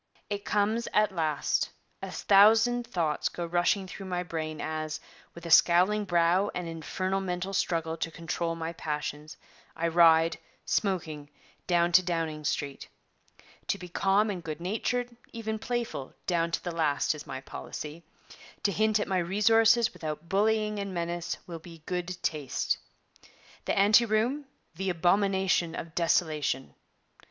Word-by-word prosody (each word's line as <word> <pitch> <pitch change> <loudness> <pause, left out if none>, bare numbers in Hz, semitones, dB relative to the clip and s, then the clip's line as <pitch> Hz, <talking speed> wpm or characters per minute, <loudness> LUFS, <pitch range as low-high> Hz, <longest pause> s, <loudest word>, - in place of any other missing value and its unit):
'It 205 0 -2
comes 215 +3 0
at 210 -1 +4
last: 160 -5 0 0.3
a - - -5
thousand 225 +4 +4
thoughts 165 -9 0
go 175 - -5
rushing 175 +3 +1
through 190 +1 -8
my 180 -1 -2
brain 160 -2 -4
as, 155 -1 -3 0.4
with 170 - -10
a 170 - -4
scowling 185 +6 +5
brow 175 +2 +3
and 180 -1 -3
infernal 185 +4 -2
mental 185 +1 -3
struggle 165 -3 0
to 165 - -3
control 165 +1 -3
my 165 0 -4
passions, 150 -1 -5 0.4
I 170 0 0
ride, 165 -1 +5 0.3
smoking, 160 -7 -1 0.4
down 175 -1 +3
to 180 +2 +7
Downing 165 -4 -2
Street. 140 -1 -2 0.8
To - - 0
be 180 0 -9
calm 195 +4 +2
and 180 -3 -6
good 155 -1 -5
natured, 235 +6 -2 0.2
even 220 -1 -3
playful, 235 - -4
down 170 -2 +1
to 165 - -2
the 175 - -3
last, 155 -4 +1
is 150 - -10
my 130 - -5
policy; 150 +4 -7 0.6
to 200 - +2
hint 215 +2 +2
at - - -1
my 190 -1 +1
resources 225 +5 +4
without 155 +1 -6
bullying 210 +2 +1
and 200 -2 -4
menace 170 0 -3
will 170 -2 -7
be 165 -2 -13
good 180 0 -3
taste. 150 -4 -1 0.9
The - - 0
Ante 210 +4 +6
Room, 235 +7 0 0.3
the 190 +3 -3
Abomination 185 -1 +2
of 165 -1 -6
Desolation. 155 -6 0
175 Hz, 145 wpm, -29 LUFS, 165-205 Hz, 0.9 s, to